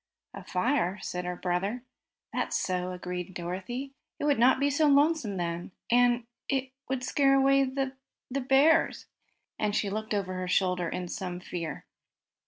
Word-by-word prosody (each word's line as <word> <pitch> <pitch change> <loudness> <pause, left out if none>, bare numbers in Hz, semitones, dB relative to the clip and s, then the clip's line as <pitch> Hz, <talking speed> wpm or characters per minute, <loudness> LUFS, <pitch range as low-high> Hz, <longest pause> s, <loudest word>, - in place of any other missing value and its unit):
"A - - -8
fire?" 195 -1 0
said 180 0 -3
her 180 0 -2
brother. 190 +7 -1 0.5
"That's - - 0
so," 180 -1 -1
agreed 180 0 -5
Dorothy. 190 +10 -4 0.2
"It - - -6
would 285 -5 +3
not 255 +2 +5
be 285 +1 +2
so 300 +2 +3
lonesome 285 -7 +3
then, 175 +1 -3 0.2
and 240 0 +4 0.2
it 265 -1 0 0.2
would 265 -1 -1
scare 275 +1 +3
away 275 0 +5
the 265 0 -2 0.4
bears!" 275 +5 +3 0.5
and 210 -1 0
she 200 -2 0
looked 215 +1 -2
over 190 -2 -2
her 185 0 -3
shoulder 180 -1 +1
in 180 - -4
some 180 -1 -4
fear. 170 -2 -5
215 Hz, 155 wpm, -29 LUFS, 180-270 Hz, 0.5 s, not